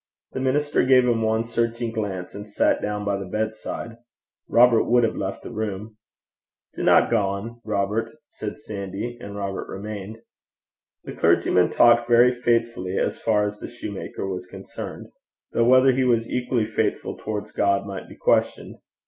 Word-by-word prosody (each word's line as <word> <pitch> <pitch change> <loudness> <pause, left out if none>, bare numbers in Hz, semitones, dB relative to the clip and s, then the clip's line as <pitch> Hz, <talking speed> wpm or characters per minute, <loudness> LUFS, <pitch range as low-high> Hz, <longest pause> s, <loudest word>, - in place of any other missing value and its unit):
The - - -4
minister 145 +3 +1
gave 130 -1 +5
him 120 -2 +1
one 110 0 +1
searching 115 0 -1
glance, 100 -5 -4
and 105 +1 -9
sat 105 - +1
down 105 0 -3
by 100 -1 0
the 100 - -5
bedside. 110 +2 -4 0.5
Robert 120 -1 +5
would 120 0 +3
have 115 - +1
left 95 0 -4
the - - -8
room. 105 0 -5 0.8
'Dinna - - +4
gang, 100 +4 -1
Robert,' 105 +5 -2
said - - -7
Sandy, 105 -1 -6
and 100 -3 -8
Robert 100 -1 -4
remained. 105 +1 -6 0.9
The - - -7
clergyman 90 -1 +3
talked 120 0 +4
very 120 +1 +6
faithfully 115 -6 0
as - - -1
far 105 -2 +2
as 105 0 -5
the - - -6
shoemaker 100 -4 -6
was 90 -1 -5
concerned; - - -8 0.5
though 115 - +2
whether 130 +2 +6
he 130 +1 +1
was 115 -2 +2
equally 125 -2 0
faithful 110 - -2
towards 105 -1 -5
God 100 0 +1
might 100 -2 -7
be - - -12
questioned. - - 0
110 Hz, 155 wpm, -24 LUFS, 100-120 Hz, 0.9 s, very